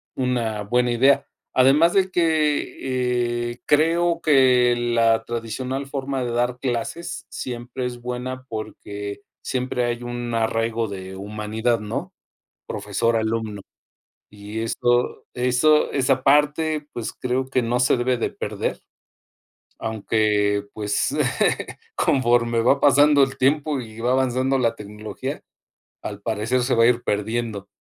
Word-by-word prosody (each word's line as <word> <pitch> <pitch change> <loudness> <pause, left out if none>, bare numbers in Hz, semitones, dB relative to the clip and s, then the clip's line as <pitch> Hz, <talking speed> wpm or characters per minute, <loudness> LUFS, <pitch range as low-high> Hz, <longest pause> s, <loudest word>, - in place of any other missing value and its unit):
una 120 -5 -1
buena 120 +4 +1
idea, 135 +4 +4 0.3
además 140 +6 +5
de 190 -1 +3
que, 130 -7 0
eh, 120 - -12
creo 165 +3 +3
que 130 -4 +4
la 115 -1 +2
tradicional 125 +4 -4
forma 135 -1 -3
de 120 - -3
dar 120 +1 0
clases 130 +7 -3
siempre 125 +1 -5
es 120 -1 -5
buena 125 +1 -5
porque 105 -1 -6 0.2
siempre 125 -1 -1
hay 120 0 -2
un 120 -1 -4
arraigo 115 0 0
de 95 -1 -7
humanidad, 105 +4 -2
¿no? 105 0 -5 0.5
Profesor-alumno 110 -2 -1 0.7
y 105 +1 -7
eso 120 +2 0
eso 125 +5 +3
esa 130 -1 +1
parte, 150 +2 +2
pues, 120 - -4
creo 130 +1 -1
que 130 -1 +1
no 120 +1 0
se 125 - +4
debe 125 +1 +1
de 115 - -2
perder. - - -4 1.0
Aunque, 105 -2 +1
pues, 105 -1 -1 0.8
conforme 120 -3 +2
va 135 +4 +3
pasando 145 0 +5
el 135 0 -2
tiempo 145 +1 +1
y 110 -1 -11
va 120 +2 0
avanzando 130 +1 +1
la 115 -2 +1
tecnología, 105 +1 -6 0.6
al 100 -1 -6
parecer 115 +4 0
se 125 - +1
va 115 0 +5
a - - +6
ir 120 0 +2
perdiendo, 105 -1 -2
120 Hz, 125 wpm, -23 LUFS, 115-130 Hz, 1.0 s, a